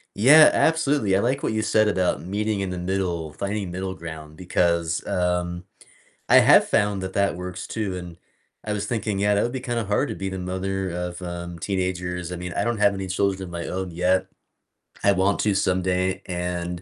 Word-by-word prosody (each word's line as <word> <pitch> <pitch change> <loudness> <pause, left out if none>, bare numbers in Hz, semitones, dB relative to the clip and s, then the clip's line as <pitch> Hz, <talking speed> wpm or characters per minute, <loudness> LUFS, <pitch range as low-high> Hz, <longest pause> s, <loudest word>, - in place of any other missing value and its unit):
Yeah, 145 +9 +8
absolutely, 145 -11 +2
I - - +3
like 130 +4 0
what - - -1
you 110 - 0
said 110 0 +3
about 95 -3 +1
meeting 105 +3 -2
in 95 -1 -2
the 90 - -4
middle, 90 -3 -2
finding 100 +1 -3
middle 95 +1 -4
ground, 80 -3 -9
because, 85 -2 0
um, 90 0 -1 0.6
I - - +5
have - - +7
found 100 -2 +1
that 95 0 -4
that 100 -3 +1
works 90 0 -6
too, 105 -4 -3
and 90 -2 -9 0.5
I 105 - -2
was 105 0 -2
thinking, 105 -3 -2
yeah, 105 +1 +2
that 100 - +2
would 120 - -1
be 130 - -4
kinda 120 -3 -2
hard 105 +1 0
to - - -4
be 95 0 -4
the 95 - -5
mother 95 +1 -3
of, 90 0 -4
um, 85 -1 -6
teenagers. 90 -2 -3
I - - -4
mean, 90 0 -6
I - - 0
don't 120 -2 -1
have 100 -1 +4
any 95 -1 -5
children 95 +1 0
of 90 - -7
my 85 -1 -5
own 95 0 -4
yet; 90 +2 +1 0.8
I 100 - +5
want 95 +1 +1
to 105 - +2
someday, 95 0 0
and 90 -1 -3
95 Hz, 205 wpm, -24 LUFS, 90-100 Hz, 0.8 s, Yeah